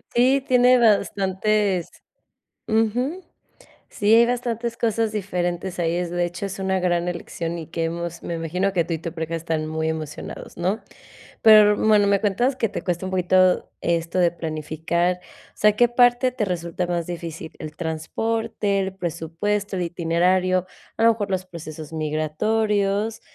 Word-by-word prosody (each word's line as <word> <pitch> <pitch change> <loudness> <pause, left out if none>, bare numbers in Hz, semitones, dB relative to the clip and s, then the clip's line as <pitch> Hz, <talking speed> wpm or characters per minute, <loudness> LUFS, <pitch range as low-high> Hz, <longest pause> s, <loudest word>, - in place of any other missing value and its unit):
Sí, 260 +3 +4
tiene 250 0 +5
bastantes 200 -3 +1 0.8
ujú. 245 - 0 0.7
Sí, 210 +1 +2
hay 235 - +7
bastantes 235 -1 -2
cosas 225 -1 0
diferentes 180 -2 -3
ahí, 170 0 +1
es 175 -1 -2
de 175 0 0
hecho 175 +3 -5
es 195 - -7
una 190 0 0
gran 175 -1 0
elección 170 -1 -4
y 160 - -8
que 165 0 -3
hemos 170 0 -4
me 170 - -3
imagino 180 +4 -1
que 170 -2 +2
tú 165 - -4
y - - -1
tu 165 0 -5
pareja 165 -1 -3
están 160 -1 -2
muy 160 0 -2
emocionados, 155 -2 -6
¿no? 185 +6 0 0.6
Pero 215 -2 +8
r - - -4
bueno, 210 -2 +4
me 200 -1 +3
cuentas 240 +6 +1
que 230 -5 0
te - - -4
cuesta 180 0 -2
un - - -4
poquito 185 0 +3
esto 170 +1 0
de 175 -1 +4
planificar, 165 +2 -2
o - - -21
sea, 210 0 +4
¿qué 240 +1 +5
parte 245 +1 +3
te 245 -4 -1
resulta 175 0 -2
más 175 -2 -2
difícil? 165 -2 -6
¿El 155 -1 -8
transporte, 200 +6 -2
el 190 0 -3
presupuesto, 190 +4 -3
el 180 - -1
itinerario, 180 +2 +1 0.3
a 225 - -1
lo 230 - +7
mejor 210 -3 -2
los 185 -1 -1
procesos 155 -2 -9
migratorios? 200 +7 0
185 Hz, 165 wpm, -23 LUFS, 170-215 Hz, 0.8 s, Pero